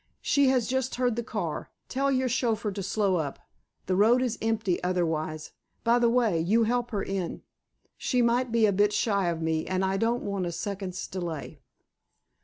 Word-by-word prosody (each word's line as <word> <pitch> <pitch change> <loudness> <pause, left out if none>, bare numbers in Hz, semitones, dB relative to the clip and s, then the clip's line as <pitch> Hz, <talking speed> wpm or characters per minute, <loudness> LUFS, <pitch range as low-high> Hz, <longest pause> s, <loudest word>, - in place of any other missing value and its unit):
"She 280 -1 +3
has 255 -3 +3
just 260 0 -1
heard 245 -2 +1
the 235 - -1
car. 230 - -4 0.2
Tell 275 +1 0
your 260 -1 +1
chauffeur 230 -4 0
to 200 0 -5
slow 195 -1 +1
up. 145 -4 -3 0.5
The 185 - 0
road 230 +6 +4
is 235 -3 -2
empty 220 -6 0
otherwise. 160 -4 -1 0.3
By 235 +1 +4
the 235 -1 +4
way, 230 -8 +2
you 210 +8 +3
help 240 +1 0
her 205 -3 -2
in. 190 -3 -4 0.6
She 250 -2 +1
might 240 +1 +2
be 230 -1 +4
a 205 - +3
bit 205 +2 +3
shy 200 -3 +1
of 165 -1 -1
me, 160 -1 0
and 185 0 0
I 190 +1 0
don't 230 +3 0
want 200 -3 -2
a - - -3
second's 190 +1 -4
delay." 170 -6 -5
210 Hz, 190 wpm, -27 LUFS, 185-240 Hz, 0.6 s, road